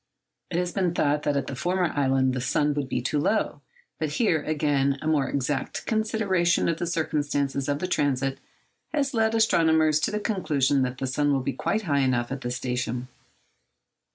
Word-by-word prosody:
It 170 - -2
had 180 0 -1
been 180 -3 0
thought 145 -2 +1
that 145 -1 0
at 140 - -1
the 135 - -5
former 180 +5 0
island 135 -2 +2
the 125 - -2
sun 145 +3 +1
would 140 -2 -3
be 125 - -2
too 145 +3 0
low; 215 +9 0 0.4
but 155 -2 -2
here, 165 -6 +2
again, 145 -3 +1
a - - -8
more 150 -4 +1
exact 140 0 -2
consideration 215 -6 +1
of 165 - 0
the 175 - -2
circumstances 145 -4 -1
of 145 - +1
the 185 - -3
transit 135 -5 0 0.6
has 275 -2 0
led 225 -1 +2
astronomers 160 -8 +3
to - - 0
the 210 - -2
conclusion 145 - +1
that 125 0 -1
the 135 - -3
sun 145 +3 +1
will 135 -2 +1
be 140 - -2
quite 220 +1 -1
high 145 -6 +1
enough 125 -2 +1
at 135 0 -4
this 120 0 -3
station. 125 0 -3
145 Hz, 190 wpm, -26 LUFS, 135-175 Hz, 0.6 s, astronomers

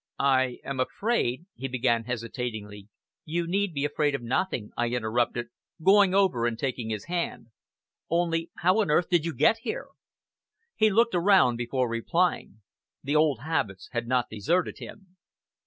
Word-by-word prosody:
"I 130 -2 +2
am 140 -1 -5
afraid 165 - -1
" - - -64
he 135 - -4
began 120 -3 0
hesitatingly. 115 -4 -5 0.4
"You 170 +2 -2
need 195 +3 0
be 140 -2 -2
afraid 145 -1 0
of 135 - -5
nothing," 120 - -1
I 120 - 0
interrupted, 120 0 -1 0.3
going 195 +2 +5
over 160 -13 +3
and 115 -1 -2
taking 125 -3 -3
his 105 -2 -4
hand. 170 -8 -3 0.6
"Only 165 0 0
how 185 +5 +3
on 205 - -1
earth 160 +3 +2
did 175 -3 +2
you 165 - -4
get 220 - +4
here?" - - -5 0.9
He 215 - +4
looked 230 +3 +3
around 175 -9 +4
before 125 +1 -1
replying. 115 - -1 0.4
The 145 +3 -1
old 150 -6 +3
habits 110 - -2
had 120 -1 -3
not 125 -1 +2
deserted 155 - -1
him. 190 -2 -12
135 Hz, 155 wpm, -27 LUFS, 120-175 Hz, 0.9 s, going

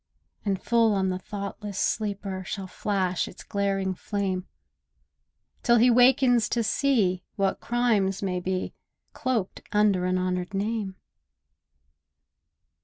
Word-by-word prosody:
And 195 -3 0
full 230 -2 +3
on 190 -1 +1
the 185 0 -2
thoughtless 200 0 -6
sleeper 200 -3 -1
Shall 195 +2 -5
flash 185 -1 -1
its - - -11
glaring 195 -2 -1
flame, 190 -1 -3 1.1
Till 240 - +4
he 245 +2 +6
wakens 245 -2 +5
to 235 - +1
see 215 -6 +2
what 195 -1 0
crimes 220 -6 +1
may 180 -2 -1
be 185 +1 -2 0.4
Cloaked 240 -7 -2
under 205 -3 +3
an 185 0 +1
honoured 185 +1 -2
name. 205 -1 -2
200 Hz, 115 wpm, -26 LUFS, 185-225 Hz, 1.1 s, he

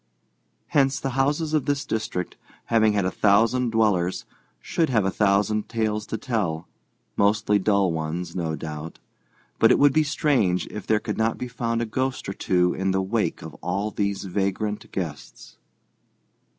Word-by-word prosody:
Hence 135 -1 +2
the 135 - -3
houses 145 +4 0
of 155 -4 +1
this 145 0 0
district, 105 -5 -3 0.4
having 110 -2 +4
had 100 -2 +1
a 95 - 0
thousand 115 +6 +3
dwellers, 105 -6 +1 0.3
should 165 -2 0
have 110 -6 +2
a 95 - +1
thousand 105 +1 +1
tales 110 -2 -1
to 110 - -3
tell, 95 - -2 0.5
mostly 105 0 +2
dull 100 -2 +2
ones, 80 +2 -4
no 80 -3 -2
doubt; 80 0 -7 0.6
but - - +6
it - - +5
would 145 -1 +5
be 155 - +4
strange 140 - +1
if 105 - -7
there 110 -1 +3
could - - -4
not 110 0 +1
be 125 - -4
found 115 -1 -2
a - - -2
ghost 130 +4 -2
or 95 - -3
two 90 -2 +1
in 95 0 -1
the 95 0 +1
wake 95 - -1
of - - -8
all 100 +4 -2
these 100 -1 -2
vagrant 100 +2 -2
guests. 80 -6 -7
105 Hz, 165 wpm, -24 LUFS, 95-115 Hz, 0.6 s, but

